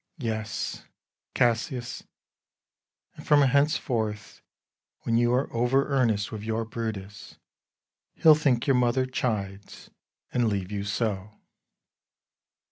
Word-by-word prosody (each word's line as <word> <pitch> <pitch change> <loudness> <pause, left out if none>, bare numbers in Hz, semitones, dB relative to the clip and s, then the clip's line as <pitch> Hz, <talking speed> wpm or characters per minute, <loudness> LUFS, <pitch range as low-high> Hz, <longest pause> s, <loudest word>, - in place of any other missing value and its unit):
Bru. 120 -7 -3
Yes, 110 -1 -4 0.5
Cassius; 120 +1 0 1.1
and, - - -13
from 145 -1 +6
henceforth, 125 -6 0 0.6
When 115 - 0
you 120 +1 +3
are 125 +3 0
over 125 +4 +2
earnest 115 -7 +1
with 110 -2 -6
your 110 +1 -2
Brutus, 105 -3 -6 0.8
He'll 160 - +7
think 140 -6 +1
your 135 - +3
mother 125 +1 +2
chides, 105 -6 -4 0.4
and 120 -2 +2
leave 100 -2 -2
you 100 -1 -3
so. 105 -1 -2
115 Hz, 110 wpm, -27 LUFS, 105-130 Hz, 1.1 s, He'll